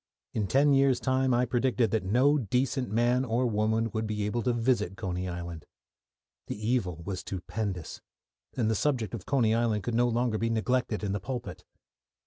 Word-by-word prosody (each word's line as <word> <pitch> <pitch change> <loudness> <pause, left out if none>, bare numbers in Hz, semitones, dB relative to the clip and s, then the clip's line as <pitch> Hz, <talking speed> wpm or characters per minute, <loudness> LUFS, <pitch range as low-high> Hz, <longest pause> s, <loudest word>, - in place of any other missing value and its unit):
In 105 -3 -1
ten 140 +6 +4
years' 135 -2 +4
time 130 0 +1
I 120 +1 +3
predicted 120 -2 +1
that 110 - +1
no 130 +10 +3
decent 125 +1 0
man 120 +4 +2
or 125 0 0
woman 110 0 +1
would 110 +1 -2
be 105 -1 -2
able 120 +3 -1
to 125 - +1
visit 115 -5 0
Coney 90 0 -3
Island. 85 -2 -6 0.8
The - - -4
evil 105 -7 -1
was 95 -1 -3
stupendous, 95 -2 -5 0.6
and 115 -4 +1
the 110 - +2
subject 120 -1 0
of 105 -6 -6
Coney 120 -6 +3
Island 115 -3 +1
could 120 - -2
no 120 +1 +3
longer 120 -2 0
be 115 - 0
neglected 115 -1 0
in 100 - -1
the 100 - -1
pulpit. 120 +2 -6
115 Hz, 180 wpm, -29 LUFS, 105-125 Hz, 0.8 s, ten